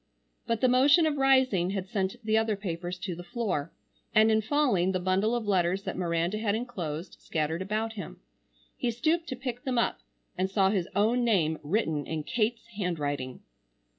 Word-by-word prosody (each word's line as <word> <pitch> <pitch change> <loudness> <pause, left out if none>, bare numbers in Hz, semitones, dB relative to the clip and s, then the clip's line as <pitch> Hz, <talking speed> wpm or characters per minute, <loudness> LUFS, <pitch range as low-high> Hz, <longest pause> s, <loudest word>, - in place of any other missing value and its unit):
But 230 -1 0
the 255 - +5
motion 280 +7 +5
of 305 -2 0
rising 260 -9 +3
had 190 0 -4
sent 190 0 -1
the 220 0 +2
other 220 -1 +2
papers 180 -2 -4
to 180 0 -4
the 175 - -8
floor, 175 -6 -2 0.4
and 220 +1 +6
in 220 0 +3
falling 220 -7 +2
the 185 - 0
bundle 190 +5 +1
of 235 -2 -2
letters 190 -1 +1
that 190 - -4
Miranda 170 +3 0
had 210 -2 +1
enclosed, 180 -8 -5
scattered 160 +2 -2
about 215 +3 -2
him. 200 -6 -8 0.6
He 245 - -1
stooped 315 +9 0
to 260 - -3
pick 250 -1 -5
them 255 -2 -1
up 235 - +1 0.4
and 185 +1 0
saw 195 -1 +3
his 190 -5 -1
own 225 +4 +3
name 165 -9 +2
written 155 -3 -1
in 160 -1 -3
Kate's 230 +6 -1
handwriting. 145 -8 -2
200 Hz, 180 wpm, -28 LUFS, 175-235 Hz, 0.6 s, and